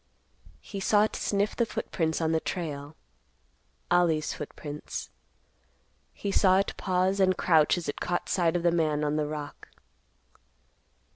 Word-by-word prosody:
He 200 - -7
saw 205 +2 +4
it 215 - -1
sniff 205 +1 0
the 235 - +2
footprints 165 -7 -2
on 160 0 +1
the 160 - +2
trail—Ollie's 145 - -3
footprints. 150 0 -7 1.0
He 200 - -4
saw 190 -1 +4
it 195 - 0
pause 185 +1 0
and 185 -1 +3
crouch 160 -1 +4
as 175 - -5
it 145 - -4
caught 175 - -1
sight 175 -2 +1
of 175 - 0
the 170 - +4
man 155 -3 +1
on 150 0 0
the 150 -1 0
rock. 150 -1 -7
165 Hz, 140 wpm, -28 LUFS, 150-185 Hz, 1.0 s, saw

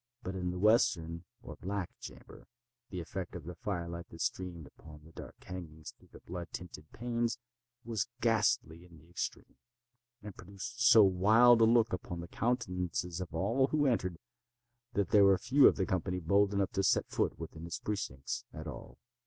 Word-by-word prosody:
But 95 - -4
in 90 -1 -2
the 90 - -4
western 90 -5 +2 0.2
or - - -9
black 95 -1 -4
chamber - - -12 0.4
the 90 - -5
effect 90 +2 -6
of 85 - -7
the 90 +3 -7
fire 85 0 -4
light 85 0 -7
that 80 - -10
streamed 90 -4 -3
upon 75 +1 -14
the 80 - -16
dark - - -10
hangings 80 -4 -8
through - - -25
the - - -14
blood 85 0 -6
tinted 80 -4 -9
panes, 120 0 -2 0.5
was 110 -5 -1
ghastly 105 -8 +1
in 85 -2 -16
the 80 +2 -19
extreme, 85 - -5 0.7
and 105 -2 -8
produced 100 +7 -8
so 120 -2 +8
wild 110 +6 +6
a - - +8
look 115 -1 +4
upon 90 -1 -4
the 85 - -6
countenances 90 -6 -2
of 90 - -5
those 115 - +1
who 150 -1 +2
entered, 95 -9 0 0.8
that 100 -4 0
there 105 -1 +7
were 100 -1 +5
few 135 +6 +5
of - - +4
the 95 - 0
company 90 0 -1
bold 100 +4 +3
enough 100 -2 0
to 95 - 0
set - - +3
foot - - -1
within 80 0 -8
its 85 - -4
precincts 70 -10 -4
at 80 0 -8
all. 75 -5 -9
90 Hz, 185 wpm, -32 LUFS, 85-110 Hz, 0.8 s, so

